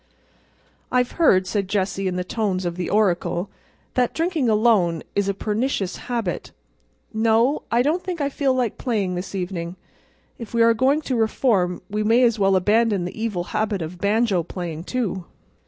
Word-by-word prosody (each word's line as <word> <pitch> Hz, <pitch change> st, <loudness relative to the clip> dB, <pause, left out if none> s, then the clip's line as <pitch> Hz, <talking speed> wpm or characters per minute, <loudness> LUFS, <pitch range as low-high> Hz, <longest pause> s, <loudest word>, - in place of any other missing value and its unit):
"I've 250 Hz, -1 st, +2 dB
heard," 190 Hz, -, +4 dB
said 200 Hz, 0 st, -1 dB
Jessie 195 Hz, 0 st, -1 dB
in 180 Hz, -, -2 dB
the 180 Hz, -, -1 dB
tones 190 Hz, -2 st, -2 dB
of 170 Hz, -1 st, -2 dB
the 180 Hz, -1 st, -3 dB
oracle, 180 Hz, -3 st, +1 dB, 0.4 s
"that 250 Hz, -1 st, +1 dB
drinking 325 Hz, -7 st, 0 dB
alone 210 Hz, -7 st, +3 dB
is 200 Hz, -1 st, 0 dB
a -, -, +1 dB
pernicious 210 Hz, -2 st, -1 dB
habit. 230 Hz, -7 st, -3 dB, 0.6 s
No, 225 Hz, +5 st, +2 dB
I 235 Hz, +1 st, +3 dB
don't 320 Hz, +6 st, 0 dB
think 360 Hz, -2 st, -4 dB
I 285 Hz, -, +1 dB
feel 280 Hz, -1 st, 0 dB
like 245 Hz, -4 st, -1 dB
playing 210 Hz, -8 st, -1 dB
this 180 Hz, +2 st, -5 dB
evening. 180 Hz, -2 st, -4 dB, 0.6 s
If 230 Hz, -1 st, -7 dB
we 230 Hz, -, +5 dB
are 230 Hz, 0 st, +5 dB
going 270 Hz, +6 st, +2 dB
to 260 Hz, -, -1 dB
reform 215 Hz, -6 st, +1 dB
we 210 Hz, +1 st, -2 dB
may 225 Hz, +4 st, +4 dB
as 230 Hz, -2 st, +3 dB
well 195 Hz, -1 st, +3 dB
abandon 205 Hz, 0 st, +2 dB
the 180 Hz, +5 st, -6 dB
evil 205 Hz, -6 st, -1 dB
habit 210 Hz, -4 st, 0 dB
of 170 Hz, +3 st, -7 dB
banjo 205 Hz, -2 st, +2 dB
playing, 170 Hz, -1 st, -6 dB
too." 195 Hz, -8 st, -2 dB
210 Hz, 170 wpm, -22 LUFS, 185-235 Hz, 0.6 s, we